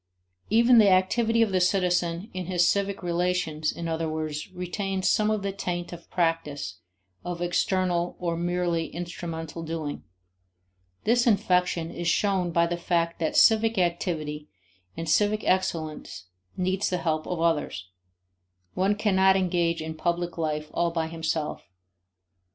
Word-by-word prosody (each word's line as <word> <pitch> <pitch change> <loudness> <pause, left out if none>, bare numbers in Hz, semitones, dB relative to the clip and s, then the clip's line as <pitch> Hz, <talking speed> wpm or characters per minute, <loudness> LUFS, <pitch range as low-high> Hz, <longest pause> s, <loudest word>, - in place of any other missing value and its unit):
Even 235 +2 +6
the 205 -2 +6
activity 225 +5 +3
of 215 - -1
the 185 -1 +2
citizen 180 +1 +1
in 185 -2 -5
his 175 -2 +3
civic 200 0 0
relations, 175 -3 0
in 170 - -5
other 160 0 -1
words, 155 +1 -4
retains 185 +1 -2
some 215 0 +3
of 215 -2 0
the 200 - -1
taint 175 -3 -4
of 170 -1 -11
practice, 165 - -1 0.4
of 175 0 -4
external 175 0 0
or 170 -2 -1
merely 175 -1 -1
instrumental 165 -1 -6
doing. 160 -2 -4 1.0
This 240 +2 +3
infection 180 -5 +2
is 175 0 -4
shown 190 0 +1
by 170 0 +3
the 170 +1 -2
fact 170 -1 0
that 160 - 0
civic 225 0 +5
activity 165 -4 -1 0.5
and 165 - -4
civic 210 +6 +2
excellence 160 - -1 0.3
need 185 +1 0
the 185 - +1
help 155 -3 -1
of 180 - -3
others; 150 - 0 0.9
one 195 +3 +1
cannot 190 -2 +3
engage 175 -3 +1
in 160 0 -5
public 175 +2 -2
life 155 -2 -2
all 170 - +1
by 165 -1 -2
himself. 160 - -3
175 Hz, 140 wpm, -26 LUFS, 165-190 Hz, 1.0 s, Even